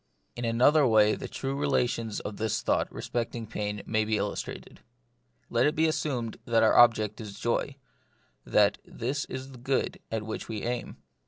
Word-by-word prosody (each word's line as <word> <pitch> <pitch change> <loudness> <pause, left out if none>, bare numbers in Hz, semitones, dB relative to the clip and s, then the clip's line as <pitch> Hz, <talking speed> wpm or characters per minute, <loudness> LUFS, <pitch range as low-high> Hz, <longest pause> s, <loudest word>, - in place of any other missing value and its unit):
In 120 - -4
another 130 +6 +4
way 110 -2 +5
the - - -5
true 135 0 -4
relations 120 -6 0
of 105 - -6
this 110 -1 -1
thought - - +1
respecting 115 -1 -3
pain 105 -1 -4
may 110 -1 +1
be 110 0 0
illustrated. - - -5 0.7
Let 120 +3 +2
it 150 - 0
be 160 - +3
assumed 130 -7 -1
that 115 -1 +3
our 110 - +4
object 110 -3 +5
is 100 -2 -8
joy, 125 +3 -1 0.7
that 105 -1 +3
this 135 +5 -3
is 130 +1 -7
the 130 - -12
good 130 +2 -1
at 110 -1 -2
which 110 - -5
we 110 -2 -4
aim. 120 0 -3
115 Hz, 170 wpm, -28 LUFS, 110-130 Hz, 0.7 s, way